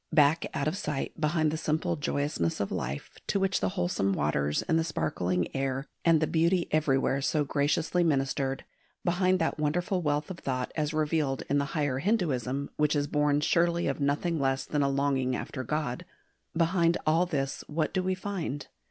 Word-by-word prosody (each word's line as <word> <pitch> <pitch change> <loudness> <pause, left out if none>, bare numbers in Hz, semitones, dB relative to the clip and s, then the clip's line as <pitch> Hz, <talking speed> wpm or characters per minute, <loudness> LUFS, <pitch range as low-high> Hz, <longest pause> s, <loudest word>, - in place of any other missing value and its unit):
Back 155 0 +4
out 140 - 0
of 155 - 0
sight 150 -9 -3
behind 155 0 +2
the 160 - -2
simple 160 +2 0
joyousness 145 - -1
of 100 - -2
life, 65 +3 -4 0.2
to 200 - +1
which 190 0 +1
the - - 0
wholesome 175 - +1
waters 75 -2 0
and 160 - +2
the - - +1
sparkling 90 - -1
air 135 0 -1 0.2
and 165 -2 +5
the 155 - +2
beauty 170 +3 +2
everywhere 135 -3 +2
so 150 +2 +1
graciously 150 +5 +1
ministered, 135 -3 0 0.4
behind 185 +1 +3
that 160 -2 -1
wonderful 175 +5 0
wealth 150 +3 -1
of 175 - -7
thought 130 -2 -2
as 150 -1 0
revealed 155 -3 0
in 145 - +4
the 140 - 0
Higher 145 -3 0
Hinduism 140 - 0
which 150 0 +2
is 145 -1 +1
born 150 0 +2
surely 170 +2 +2
of 140 - -1
nothing 150 +4 0
less 135 0 0
than 150 - 0
a 140 - +2
longing 135 -2 +1
after 130 +1 -5
God 140 -2 -2 0.5
behind 170 0 +3
all 165 +3 +3
this 135 -5 -2
what 155 +1 -1
do 190 - +1
we 185 0 0
find? 185 -7 -4
150 Hz, 180 wpm, -29 LUFS, 135-170 Hz, 0.5 s, and